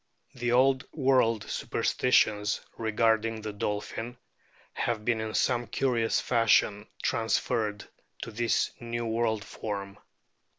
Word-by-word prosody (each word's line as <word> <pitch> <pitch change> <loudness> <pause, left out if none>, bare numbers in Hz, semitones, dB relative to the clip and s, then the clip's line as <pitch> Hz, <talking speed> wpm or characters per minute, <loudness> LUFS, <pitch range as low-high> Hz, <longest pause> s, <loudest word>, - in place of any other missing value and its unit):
The 120 -1 -2
old 130 +2 +4
world 130 -6 +2
superstitions 105 -4 +1
regarding 110 0 +1
the 105 -1 -4
dolphin 105 +4 -4 0.6
have 110 -3 -2
been 115 -2 +1
in 110 0 -4
some 120 -2 +1
curious 120 -4 +1
fashion 110 -3 +2 0.2
transferred 110 -2 0 0.4
to 115 - -7
this 120 +1 +1
new 120 0 -4
world 110 -2 0
form. 100 -2 -6
115 Hz, 110 wpm, -28 LUFS, 105-120 Hz, 0.6 s, old